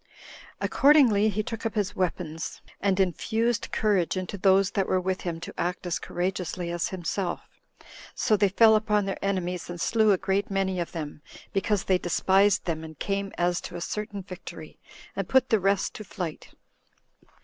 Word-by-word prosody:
Accordingly, 255 -8 +5
he 215 +1 -1
took 225 +1 -6
up 225 -1 -2
his 205 -1 -1
weapons, 165 -4 -3 0.2
and 195 -1 +1
infused 220 +5 0
courage 195 -5 +1
into 185 +2 -4
those 195 0 +4
that 195 - 0
were 185 - +2
with 185 +1 -2
him 170 -2 -3
to - - -7
act 175 +2 -2
as 170 -4 -1
courageously 180 -1 -3
as 175 -1 -1
himself. 180 0 -3 0.7
So 215 - +2
they 200 -1 +3
fell 220 +3 +6
upon 210 -1 +2
their 195 -1 -4
enemies, 180 -3 -2
and 175 0 -6
slew 220 +3 +3
a 195 - +4
great 195 +2 0
many 190 -2 0
of 170 - -3
them, 150 -3 -6 0.3
because 200 0 +1
they 185 -1 +2
despised 190 +3 +3
them 160 -2 -2
and 160 -1 -10
came 195 +2 -2
as 175 0 +1
to - - -8
a 175 - -5
certain 205 +1 -4
victory, 185 -1 -10 0.4
and - - -3
put 260 -1 +4
the 220 - +4
rest 195 0 +1
to 215 - -7
flight. 180 -5 -6
190 Hz, 175 wpm, -27 LUFS, 175-205 Hz, 0.7 s, fell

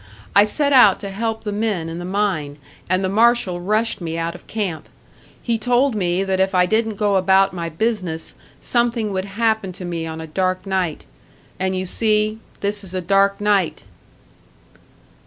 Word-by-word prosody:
I 200 +1 +7
set 285 +6 +2
out 210 -7 +6
to 200 - -5
help 220 +2 -3
the 210 - -3
men 205 -5 -1
in 165 +1 -6
the 175 - -6
mine, 185 -7 -1 0.3
and 185 +1 +1
the - - +1
marshal 220 -3 +2
rushed 215 +3 0
me 165 -1 -4
out 165 0 -2
of - - -14
camp. 185 -8 -4 0.5
He 230 -2 0
told 245 +3 +2
me 185 -2 0
that 190 -1 -1
if 190 0 +1
I 180 0 +5
didn't 220 +2 0
go 205 -1 +1
about 190 +1 +3
my 170 -2 -4
business, 180 -3 -2 0.3
something 235 -3 0
would 190 0 -2
happen 220 -1 0
to 180 - -8
me 165 -2 -4
on 160 0 -6
a 160 - -6
dark 185 +3 -1
night. 185 -5 -2 0.5
And 190 0 0
you 185 - -2
see 215 +2 +1 0.2
this 205 0 -2
is 190 -1 -7
a 185 - -1
dark 195 +2 +2
night!" 205 -4 +1
195 Hz, 180 wpm, -20 LUFS, 180-215 Hz, 0.5 s, I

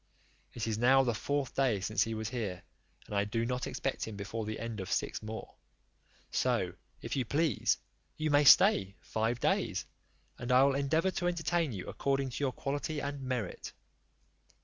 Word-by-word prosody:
It 115 - -2
is 110 -1 -1
now 135 +3 +6
the 120 -2 +1
fourth 140 +4 -2
day 130 -7 +2
since 110 +3 0
he 115 0 +1
was 110 -1 -3
here, 105 -8 -4 0.4
and - - -9
I 100 - +3
do 115 +3 -1
not 125 +1 -2
expect - - -2
him 110 - -6
before 105 +2 -4
the 110 - -3
end 115 -2 -4
of 95 - -5
six - - -1
more; 110 +1 -7 0.8
so, - - +1 0.3
if - - -3
you 135 - +1
please, 145 +1 +1 0.4
you 155 -1 0
may 145 0 +5
stay 100 -7 +6
five 110 +2 -1
days, - - 0 0.5
and 120 +1 -3
I 130 +1 +7
will 140 0 +4
endeavour 155 +7 +1
to 175 -1 -1
entertain 170 -3 0
you 95 -5 -5
according 135 -1 -1
to 145 - -4
your 135 - +2
quality 145 +3 -3
and 140 -1 -4
merit." 125 -7 -4
125 Hz, 180 wpm, -32 LUFS, 110-140 Hz, 0.8 s, I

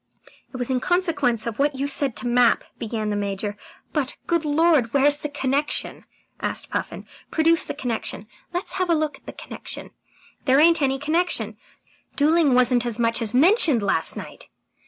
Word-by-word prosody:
"It 255 - -7
was 245 +1 -2
in 255 - +1
consequence 290 - 0
of 230 0 -5
what 285 0 +1
you 275 +1 -2
said 275 -3 +1
to - - -4
Mapp 240 0 +3
" - - -40
began 220 -1 -3
the - - -1
Major. 205 0 -3 0.4
"But, 285 -4 -2
good 335 -2 0
Lord, 300 -5 +2
where's 290 +1 +4
the 295 - -5
connection?" 285 +1 -1 0.3
asked - - -4
Puffin. - - -4 0.2
"Produce 330 +1 +3
the - - -5
connection! 235 -6 -4 0.3
Let's 355 +1 -4
have 365 - 0
a 335 - +4
look 305 -3 -2
at - - -30
the - - -5
connection! - - -6 0.5
There 270 +1 +4
ain't 335 +1 +5
any 270 -1 +1
connection! 325 +5 -1 0.6
Duelling 300 -2 +3
wasn't 250 -1 +4
as 240 -2 -1
much 230 -1 +1
as 225 0 -1
mentioned 305 - +4
last 165 -5 +1
night." - - -10
275 Hz, 180 wpm, -23 LUFS, 240-310 Hz, 0.6 s, ain't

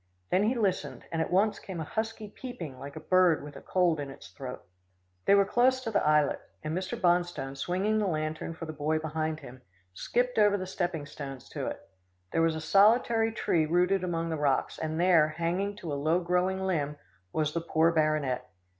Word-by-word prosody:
Then 190 +3 +3
he 240 +4 +2
listened, 205 -6 -1
and 165 -1 0
at - - -1
once 205 +4 +2
came 185 -3 -7
a - - -2
husky 220 +5 -4
peeping 200 - -8
like 140 +2 -8
a - - -5
bird 175 -1 +3
with 145 0 -9
a - - -9
cold 175 -4 +1
in 140 -1 -4
its 135 - -11
throat. 130 -2 -7 0.6
They 200 - +6
were 200 0 +5
close 255 +5 +3
to 225 - -3
the 205 - +2
islet, 150 -1 +3 0.2
and 155 +1 -2
Mr. 185 0 -3
Bonstone, 175 -6 +1
swinging 190 +9 0
the 210 - +1
lantern 155 0 -3
for 165 - -6
the 155 - -6
boy 155 +1 0
behind 155 0 -2
him, 125 +1 -11 0.3
skipped 245 - 0
over 205 -1 +5
the 185 - -4
stepping 175 -5 -2
stones 135 -3 -8
to - - -4
it. - - -6 0.4
There 165 - +1
was 165 -1 +2
a 160 - -4
solitary 225 +5 +4
tree 165 -7 +1
rooted 180 +3 +2
among 165 -2 -1
the 160 - -1
rocks, 145 -3 0
and 160 0 -2
there, 170 -4 +5
hanging 175 +6 -2
to 165 -7 -5
a 140 - -3
low 160 +4 +3
growing 180 +2 0
limb, 150 -5 -1 0.3
was 155 -1 0
the 170 - -1
poor 165 0 +3
baronet. 155 - 0
170 Hz, 205 wpm, -29 LUFS, 155-195 Hz, 0.6 s, They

